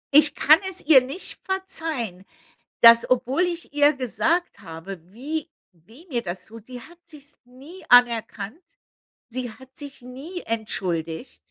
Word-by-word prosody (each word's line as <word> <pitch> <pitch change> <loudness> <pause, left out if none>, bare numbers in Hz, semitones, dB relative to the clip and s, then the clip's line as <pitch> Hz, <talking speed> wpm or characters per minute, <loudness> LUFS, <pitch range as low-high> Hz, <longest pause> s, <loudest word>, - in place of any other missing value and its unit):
Ich 300 0 +6
kann 310 +2 +6
es 380 0 -6
ihr 290 -4 +8
nicht 275 +9 -7
verzeihen 320 - -4 0.6
dass, 230 0 +8
obwohl 255 +5 +1
ich 340 -4 -4
ihr 290 +1 +5
gesagt 315 +7 -1
habe, 165 +3 -9
wie 290 +7 -4 0.2
weh 220 - -19
mir 245 -5 -1
das 175 0 -6
tut, 225 -1 -13
die 250 -1 -9
hat 345 +2 -15
sich's 295 -2 -14
nie 280 +9 -14
anerkannt. 235 - +3 0.7
Sie 250 0 -4
hat 260 +3 -17
sich 285 -3 -9
nie 280 +9 -8
entschuldigt. 185 -3 -3
255 Hz, 140 wpm, -24 LUFS, 225-310 Hz, 0.7 s, ihr